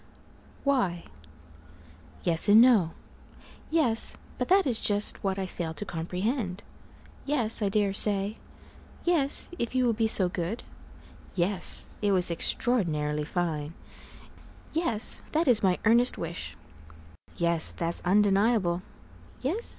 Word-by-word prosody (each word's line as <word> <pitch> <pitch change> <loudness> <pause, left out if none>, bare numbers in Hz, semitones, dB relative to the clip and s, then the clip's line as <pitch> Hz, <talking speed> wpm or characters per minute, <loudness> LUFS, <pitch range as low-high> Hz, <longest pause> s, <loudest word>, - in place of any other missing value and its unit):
Y 220 -12 0 1.2
Yes 165 +3 +2
and 210 +2 +8
no 230 -9 +5 0.8
Yes, 275 -9 0 0.2
but - - -1
that 385 0 +4
is 240 -5 0
just 205 0 +1
what 195 -1 -1
I 190 - -2
fail 170 -3 -5
to 205 - -5
comprehend 185 - -3 0.6
Yes, 240 -7 -1
I 205 - +1
dare 200 -1 +1
say 205 +1 +1 0.7
Yes, 315 -6 0
if 235 +2 -3
you 255 -1 +2
will 235 - +2
be 225 0 0
so 190 -4 +2
good 180 +5 -4 0.7
Yes, 185 +1 +1 0.2
it 205 -1 +2
was 180 -2 +1
extraordinarily 155 - +1
fine 160 -2 -3 1.0
Yes, 245 -10 +1
that 320 +2 +1
is 240 -4 +4
my 185 -2 +2
earnest 235 +3 +3
wish 170 0 -6 0.8
Yes, 170 -1 +3
that's 170 0 -3
undeniable 200 -1 +2 0.6
Yes? 370 - 0
205 Hz, 120 wpm, -27 LUFS, 175-240 Hz, 1.2 s, and